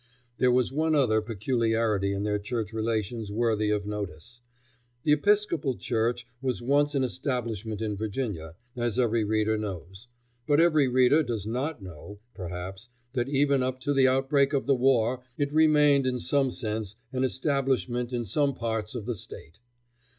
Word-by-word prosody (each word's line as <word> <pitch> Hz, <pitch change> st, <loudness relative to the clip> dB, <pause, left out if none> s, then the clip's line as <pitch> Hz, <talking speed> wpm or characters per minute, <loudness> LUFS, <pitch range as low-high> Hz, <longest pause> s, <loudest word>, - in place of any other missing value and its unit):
There 125 Hz, -, +4 dB
was 125 Hz, +1 st, +2 dB
one 155 Hz, +2 st, +1 dB
other 115 Hz, -7 st, +3 dB
peculiarity 110 Hz, -2 st, 0 dB
in 100 Hz, 0 st, -2 dB
their 105 Hz, 0 st, 0 dB
church 110 Hz, 0 st, -4 dB
relations 110 Hz, -1 st, -2 dB
worthy 110 Hz, -1 st, +1 dB
of 105 Hz, -1 st, 0 dB
notice. 105 Hz, +2 st, -6 dB, 0.6 s
The 150 Hz, -, +2 dB
Episcopal 160 Hz, -, +2 dB
Church 120 Hz, +1 st, -1 dB, 0.2 s
was 130 Hz, -2 st, -1 dB
once 145 Hz, +4 st, +2 dB
an 135 Hz, -, +2 dB
establishment 115 Hz, -5 st, -3 dB
in 105 Hz, -2 st, -2 dB
Virginia, 100 Hz, -7 st, -4 dB, 0.2 s
as 120 Hz, -2 st, -1 dB
every 115 Hz, -3 st, +2 dB
reader 110 Hz, +1 st, +1 dB
knows, 95 Hz, +1 st, -7 dB, 0.4 s
but 145 Hz, 0 st, +4 dB
every 155 Hz, -4 st, +4 dB
reader 130 Hz, +4 st, +4 dB
does 115 Hz, -8 st, -3 dB
not 125 Hz, +2 st, -3 dB
know, 95 Hz, +3 st, -10 dB, 0.2 s
perhaps, 95 Hz, +4 st, -7 dB, 0.2 s
that 125 Hz, 0 st, -1 dB
even 140 Hz, -1 st, +2 dB
up 130 Hz, 0 st, -2 dB
to 145 Hz, +2 st, 0 dB
the 135 Hz, -1 st, +5 dB
outbreak 135 Hz, +2 st, +2 dB
of 140 Hz, -, 0 dB
the 140 Hz, -, +3 dB
war 125 Hz, -1 st, +2 dB, 0.2 s
it 145 Hz, 0 st, -1 dB
remained 150 Hz, -3 st, +5 dB
in 125 Hz, -1 st, -1 dB
some 140 Hz, +1 st, +1 dB
sense 110 Hz, -4 st, -4 dB, 0.2 s
an 130 Hz, 0 st, 0 dB
establishment 130 Hz, -2 st, 0 dB
in 120 Hz, -2 st, -2 dB
some 140 Hz, +6 st, +1 dB
parts 110 Hz, 0 st, -3 dB
of 115 Hz, -4 st, -5 dB
the 120 Hz, -, -1 dB
State. 85 Hz, -4 st, -11 dB
120 Hz, 160 wpm, -27 LUFS, 105-135 Hz, 0.6 s, the